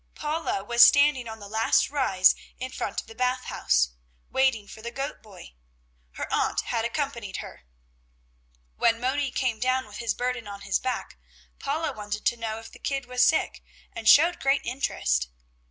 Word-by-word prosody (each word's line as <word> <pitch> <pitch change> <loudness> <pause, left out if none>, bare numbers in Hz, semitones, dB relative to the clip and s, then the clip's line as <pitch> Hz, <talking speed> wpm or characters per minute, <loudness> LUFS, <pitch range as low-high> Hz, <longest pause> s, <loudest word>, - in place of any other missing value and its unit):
Paula 305 -9 -2
was 235 +3 +2
standing 265 +1 +6
on 220 0 -7
the 205 -2 -10
last 220 +5 +2
rise 195 -11 +4 0.2
in 255 0 -5
front - - -3
of - - -21
the 225 - -12
Bath 250 +2 0
House, - - +1 0.4
waiting 260 -6 +2
for 220 - -11
the 235 - -5
goat 275 +4 -5
boy. 195 - -14 0.6
Her - - -5
aunt - - +1
had 230 -2 -2
accompanied 235 -5 -3
her. 65 - -9 1.1
When 230 0 +3
Moni 265 +3 0
came 250 -3 -1
down 255 +2 +1
with 210 -1 -11
his 230 -2 -1
burden 245 -3 -3
on 200 -1 -8
his 200 0 0
back, 255 -1 -4 0.4
Paula 310 +3 -2
wanted 210 0 -5
to - - +3
know 225 -2 -4
if 225 0 -11
the - - -15
kid 275 -2 -2
was 250 0 +2
sick, 315 - +1 0.3
and 220 - +1
showed 335 +4 +6
great 275 +1 +2
interest. 60 - 0
240 Hz, 175 wpm, -26 LUFS, 215-265 Hz, 1.1 s, standing